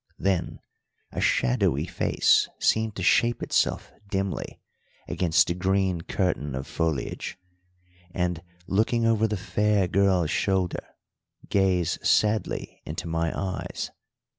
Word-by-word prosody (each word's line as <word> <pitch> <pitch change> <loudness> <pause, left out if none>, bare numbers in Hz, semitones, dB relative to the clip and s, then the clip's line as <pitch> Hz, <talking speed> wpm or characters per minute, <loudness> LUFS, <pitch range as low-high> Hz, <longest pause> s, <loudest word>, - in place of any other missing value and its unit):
Then 90 -2 -1 0.5
a - - -3
shadowy 60 0 +2
face - - +2
seemed 110 -1 +1
to 95 - -4
shape 120 +6 +3
itself - - 0 0.2
dimly 95 -1 -3 0.5
against 85 -3 +3
the 85 - -1
green 95 -1 0
curtain 80 -7 -1
of 65 +1 -4
foliage, 80 0 -3 0.7
and, 90 -1 -2 0.2
looking 115 +4 +1
over 110 -1 +3
the 105 -1 -2
fair 105 0 +1
girl's 95 -3 +2
shoulder, 95 -3 0 0.6
gaze 95 -4 +1
sadly 105 0 +1
into 80 +2 -5
my 80 0 0
eyes. 95 -2 -4
95 Hz, 115 wpm, -26 LUFS, 85-100 Hz, 0.7 s, shape